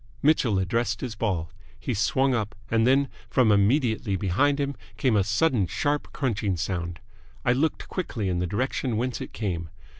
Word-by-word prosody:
Mitchell 135 -8 +3
addressed 110 +4 0
his 125 -4 -3
ball. 95 -7 -2 0.3
He - - -2
swung 130 +5 +2
up, 110 -3 -2 0.2
and 115 +1 +3
then, 135 +2 +4 0.2
from 125 -5 +4
immediately 110 0 +2
behind 120 +11 +2
him 140 0 0 0.2
came 115 +1 +2
a 100 - +4
sudden 105 - +2
sharp 145 +8 -1
crunching 105 -8 -1
sound. 85 -1 -3 0.5
I 125 - +4
looked 155 +5 0
quickly 120 - -3
in 90 -1 0
the 90 - 0
direction 125 +3 -1
whence 125 +2 -2
it - - -6
came. 85 -7 -3
110 Hz, 170 wpm, -26 LUFS, 95-130 Hz, 0.5 s, then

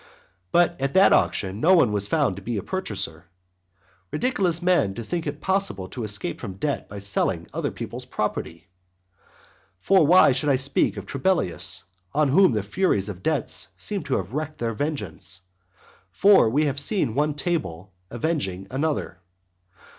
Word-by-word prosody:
But 175 -4 +2
at 135 +3 -1
that 190 +1 +6
auction 95 +1 +1
no 180 +9 +5
one 130 -11 +4
was 100 -1 -1
found 145 - +1
to 100 - -9
be 115 +3 -3
a 100 - -3
purchaser. 100 - -4 0.9
Ridiculous 195 -10 0
man 175 - +2
to 115 - -5
think 165 +7 -3
it 145 +1 -5
possible 190 - 0
to 120 - -6
escape 100 -5 -3
from 100 -6 -6
debt 145 +8 -3
by 100 - -8
selling 100 0 -1
other - - -1
people's - - -7
property! 85 +3 -4 1.1
For 190 - +4
why 180 -3 +7
should 130 +3 0
I 140 - +4
speak 135 +2 +1
of - - -6
Trebellius? 130 - 0 0.3
on 150 -1 +3
whom 185 0 +5
the 105 -2 -1
furies 105 - 0
of 95 -3 -7
debts 140 -9 -1
seem 200 - -2
to 135 - 0
have 95 +4 -5
wrecked 155 +1 -4
their 115 -1 -2
vengeance, 100 - -4 0.7
for 195 - +5
we 145 +6 +2
have 140 -1 -1
seen 145 - 0
one 145 +3 0
table 95 - -3 0.2
avenging 120 - -2
another. 140 -8 -2
135 Hz, 160 wpm, -24 LUFS, 100-165 Hz, 1.1 s, why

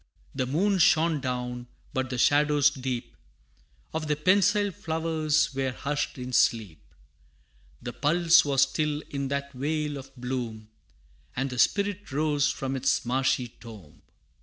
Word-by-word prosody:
The 130 -2 -2
moon 190 +8 +1
shone 160 -1 +4
down, 125 -1 -4 0.3
but 130 -1 -1
the 125 - -3
shadows 145 +2 +4
deep 130 -3 -5 0.8
Of 160 -1 -3
the 150 - +1
pensile 200 +5 +3
flowers, 160 -4 0
were 135 0 -1
hushed 145 +2 -3
in 125 0 -6
sleep. 110 -10 +1 1.0
The 120 - -5
pulse 165 +2 +4
was 140 -2 +3
still 150 +2 -1
in 140 -1 -2
that 140 0 -3
vale 150 +2 -2
of 135 0 -10
bloom, 120 -4 -5 0.7
And 130 +1 -2
the 125 - -5
Spirit 205 +1 +1
rose 145 0 +1
from 135 -1 -3
its 130 -1 0
marshy 125 0 0
tomb. 110 -10 -14
140 Hz, 135 wpm, -27 LUFS, 125-155 Hz, 1.0 s, shone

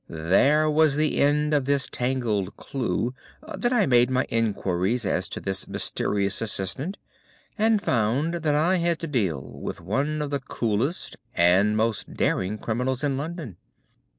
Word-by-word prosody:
There 115 - +3
was 155 -1 +3
the 155 +1 +1
end 150 +1 +2
of 145 -3 +2
this 140 -1 +1
tangled 120 -6 -1
clue. 125 -2 -2 0.4
Then 240 - 0
I 235 -6 +3
made 120 -1 +4 0.2
inquiries 105 0 0
as 95 0 -1
to - - -5
this 95 -1 -3
mysterious 100 0 -1
assistant 115 - -2 0.6
and 220 0 +3
found 130 - 0
that 150 -2 +1
I 170 +5 +3
had 170 -1 +1
to 165 - -3
deal 95 - -2
with - - -5
one 140 - -1
of 145 - -5
the 140 - 0
coolest 125 - -2 0.2
and 95 +5 +4
most 110 -2 -1
daring 95 +3 0
criminals 125 +5 -2
in 140 -2 +1
London. 150 - -5
125 Hz, 150 wpm, -25 LUFS, 105-150 Hz, 0.6 s, made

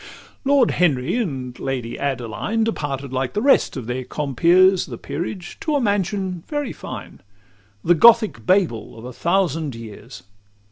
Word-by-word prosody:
L 280 0 +3
Lord 260 -5 +4
Henry 155 - +1
and 135 - -3
the - - -15
Lady 125 -3 -3
Adeline 140 - -2
Departed 140 - -3
like 130 -1 -2
the 205 - 0
rest 275 - +3
of 125 - -5
their 125 +2 -3
compeers, 170 +8 +3
The 120 -5 -7
peerage, 175 - -6
to 310 -2 -1
a - - +3
mansion 195 -5 -1
very 290 -4 -3
fine; - - -9 0.6
The 175 - +5
Gothic 225 +4 +5
Babel 175 - +1
of 115 - -10
a 125 - -7
thousand 165 -4 0
years. 115 0 -10
165 Hz, 155 wpm, -21 LUFS, 130-200 Hz, 0.6 s, The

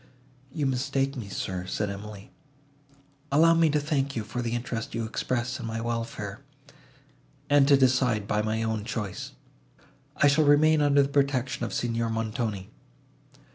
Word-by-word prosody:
"You 145 +1 -2
mistake 135 +1 0
me, 115 -6 -6
sir," 90 -1 -4
said 105 +1 -2
Emily. 100 0 -9 1.0
"Allow 165 +4 +5
me 165 -1 +4
to 150 0 +2
thank 140 -2 -1
you 110 - -2
for 125 +3 -4
the 120 0 -2
interest 120 -1 -4
you 115 0 -2
express 125 +2 -2
in - - -5
my 115 0 -3
welfare, 115 0 -4 1.1
and 145 -1 +5
to 140 -1 +6
decide 125 -5 +2
by 105 +1 +1
my 110 +1 -1
own 110 -2 -2
choice. 110 -4 -5 0.8
I - - +3
shall 145 +2 +4
remain 150 +2 +5
under 145 -1 +4
the - - -1
protection 140 -2 0
of - - -8
Signor 115 -1 -1
Montoni." 110 -3 -3
120 Hz, 155 wpm, -27 LUFS, 110-140 Hz, 1.1 s, to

